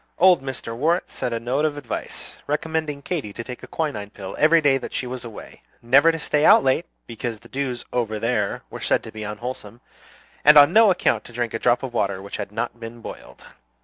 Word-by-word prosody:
Old 180 -4 +6
Mr. 130 -4 -5
Worrett 165 +8 0
sent 125 - -3
a 115 - -1
note 125 +5 -1
of 150 -2 0
advice, 140 -5 -6
recommending 150 -1 -2
Katy 140 - -3
to 115 - -6
take 125 +1 -8
a - - -10
quinine 125 -11 -3
pill 100 -2 -8
every 160 +2 +6
day 140 -3 +3
that - - -8
she - - -2
was 125 0 -5
away, 115 -3 -10 0.2
never 135 +7 +5
to 165 - -4
stay 150 -1 0
out - - +7
late, 135 +6 +1 0.2
because 115 -1 -5
the - - -15
dews 130 -3 -3
"over 115 -3 -1
there" 105 -2 -1
were - - -8
said - - +1
to - - -9
be 110 - -8
unwholesome, 105 +1 -6 0.6
and 150 +1 +8
on 145 +3 +8
no 225 -1 +7
account 180 -2 +1
to 120 - -13
drink 120 -1 -2
a 115 - -2
drop 125 +2 +2
of 130 -2 -5
water 100 -5 0
which 100 +1 -7
had 100 -1 -5
not 115 +2 -4
been 115 +1 -8
boiled. - - -11
125 Hz, 220 wpm, -23 LUFS, 115-150 Hz, 0.6 s, and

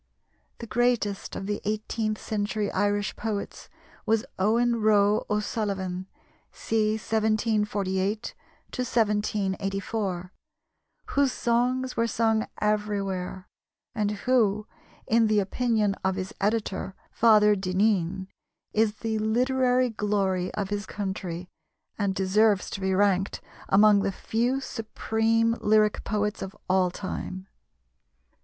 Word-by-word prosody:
The 235 - -7
greatest 230 -4 0
of 195 - -5
the 205 +1 -2
eighteenth 215 +1 -2
century 210 -1 -2
Irish 205 +1 0
poets 215 -3 -5 0.3
was 220 0 +1
Owen 235 +4 +2
Roe 210 -1 +3
O'Sullivan 195 -3 -2 0.4
(c. 215 -1 0
1748 215 -2 0 0.4
1784), 200 -4 -1 0.8
whose 280 -2 +2
songs 250 +2 0
were 230 0 +1
sung 225 -1 +1
everywhere, 200 -3 -1 0.5
and 210 -3 0 0.2
who, 215 -5 +2 0.4
in 225 0 +3
the 215 -1 +3
opinion 215 0 +1
of 190 0 +1
his 190 +3 -5
editor, 205 -2 -1 0.2
Father 210 -2 +5
Dinneen, 190 -1 0 0.5
is 215 -1 +2
the 220 -1 -1
literary 250 +3 +2
glory 195 -4 0
of 200 -2 -2
his 205 0 -2
country 190 -3 -4 0.5
and 200 -2 0
deserves 200 +1 +2
to 195 - -5
be 190 0 +1
ranked 195 -1 +2 0.3
among 205 +1 +6
the 195 - 0
few 240 +7 -1
supreme 225 -1 0
lyric 215 0 +3
poets 210 0 -1
of 195 +2 -6
all 185 -1 +3
time. 185 0 -6
210 Hz, 110 wpm, -26 LUFS, 195-225 Hz, 0.8 s, among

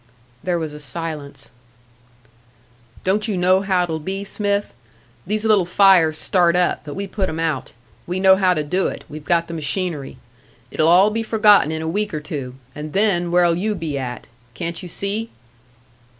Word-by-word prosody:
There 180 -1 0
was 160 -3 -4
a 150 - -9
silence. 145 -3 -7 1.5
"Don't 205 +4 +1
you 205 -4 -1
know 185 +1 +3
how 190 -2 +1
it'll 160 -2 -3
be, 190 +5 -4
Smith? 200 0 -1 0.5
These 215 +2 -1
little 215 -4 +4
fires 180 -5 +5
start 175 -1 +2
up 180 -1 +1
but 145 - -7
we 200 - -3
put 195 -1 -2
'em 160 - -4
out. 160 -5 -2 0.4
We 180 +2 -2
know 190 0 +6
how 185 -2 +2
to 155 - -1
do 180 +6 0
it, - - -6
we've 150 0 -9
got 170 +1 +1
the 170 - -7
machinery. 160 -2 -3 0.5
It'll 155 - +2
all 185 +5 +6
be 225 +1 -1
forgotten 210 -7 +4
in 160 0 -3
a - - -3
week 205 +2 -2
or - - -2
two, 140 -4 -6 0.2
and 150 0 -7
then 190 -4 +1
where'll 175 -1 +4
you 210 +5 -1
be 160 -5 -4
at? 125 -3 -5 0.3
Can't 170 +2 -4
you 180 - -8
see?" 205 +6 -2
175 Hz, 180 wpm, -20 LUFS, 160-195 Hz, 1.5 s, know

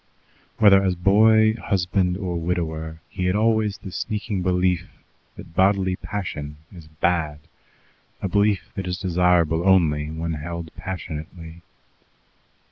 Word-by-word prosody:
Whether 100 -3 +6
as 95 -2 +1
boy, 110 +4 +5
husband, 95 -4 0
or 95 -3 -3
widower, 80 -2 -3
he 90 -2 -4
had 90 +2 +1
always 110 -1 +1
the 95 - -9
sneaking 105 -1 -3
belief 90 -1 0 0.5
that 80 - -12
bodily 95 -1 +2
passion 75 -8 -5 0.2
is 85 -4 -12
bad, 80 -1 -1 0.8
a - - -2
belief 100 0 +1
that 95 -2 -5
is 90 -1 -2
desirable 85 -2 +2
only 80 -6 +3
when 80 +1 -3
held 85 +2 -6
passionately. 80 -2 -7
90 Hz, 125 wpm, -23 LUFS, 80-100 Hz, 0.8 s, Whether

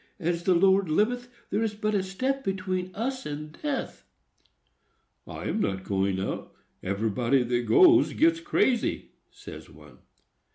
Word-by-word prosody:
As 170 -1 -1
the 185 - +4
Lord 190 0 +4
liveth, 245 +9 0 0.2
there 205 - 0
is 220 -2 -1
but 215 0 -1
a 200 - +2
step 260 +9 -2
between 185 -2 -2
us 260 +4 -3
and 150 +1 -7
death!" 290 -3 -3 1.2
"I - - -7
am - - -2
not 95 - -1
going 95 -1 -1
out; 95 - -5 0.3
everybody 115 +6 0
that 120 0 -1
goes 350 -3 +6
gets 330 +1 +3
crazy," 265 -6 0 0.2
says - - -11
one. - - -17
190 Hz, 140 wpm, -27 LUFS, -, 1.2 s, goes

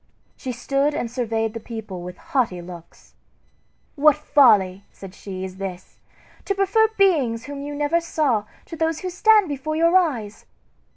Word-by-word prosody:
She 260 - -5
stood 275 +4 0
and 230 - -3
surveyed 225 -3 -2
the 230 - -5
people 215 -5 -7
with 180 +1 -8
haughty 235 -10 -1
looks. 175 -1 -12 0.8
"What 300 -1 +5
folly," 200 -9 +3
said 195 -2 -11
she, 190 -2 -7
"is 190 0 -9
this! 190 -2 -7 0.5
to 395 - -1
prefer 395 +3 +3
beings 275 - +2
whom 285 -1 -7
you 290 +1 -6
never 295 +4 +1
saw 280 -10 0 0.2
to 330 - -8
those 320 0 -1
who 370 -1 -4
stand 425 +2 +4
before 295 +1 -4
your 335 +2 +3
eyes! 245 - 0
265 Hz, 160 wpm, -22 LUFS, 205-320 Hz, 0.8 s, What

